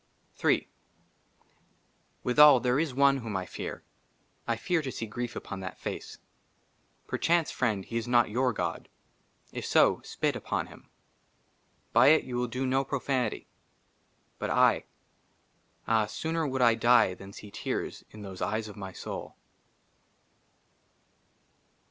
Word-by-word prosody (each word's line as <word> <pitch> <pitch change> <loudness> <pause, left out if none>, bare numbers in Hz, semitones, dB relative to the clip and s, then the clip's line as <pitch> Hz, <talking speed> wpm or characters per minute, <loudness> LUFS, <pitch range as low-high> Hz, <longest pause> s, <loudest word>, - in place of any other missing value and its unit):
HI - - +3 1.6
WITHAL, 145 +1 +7
THERE 125 +2 +1
IS 160 -2 0
ONE 140 0 +5
WHOM 115 -6 -4
I 95 - -3
FEAR; - - -6 0.6
I 115 - +1
FEAR 165 +9 0
TO 135 -3 -4
SEE 115 - -4
GRIEF 120 +2 -5
UPON 100 - -6
THAT 95 -1 -7
FACE. - - -6 0.9
PERCHANCE, 170 -2 +1
FRIEND, 105 -6 -1
HE 115 - -4
IS 115 0 -3
NOT 120 -3 +3
YOUR 125 +3 +2
GOD 110 - -4 0.6
J - - -5
IF - - -6
SO, - - +4
SPIT - - -1
UPON - - -2
HIM. - - -16 1.0
BY - - +6
IT 155 +2 +6
YOU 125 -1 -4
WILL 125 0 0
DO 125 +3 -3
NO 130 +1 +2
PROFANITY. 135 -2 -2 0.9
BUT - - -2
I - - +3 1.0
AH, 110 -2 +3
SOONER 160 +5 -2
WOULD 130 -1 -2
1 115 -1 +4
DIE 120 -5 +5
THAN 100 +1 -11
SEE 105 0 -11
TEARS 105 - -4
IN 105 -1 -11
THOSE 95 -2 -8
EYES 110 +1 -1
OF 105 - -11
MY 95 -2 -7
SOUL. - - -7
120 Hz, 140 wpm, -29 LUFS, 110-135 Hz, 1.6 s, WITHAL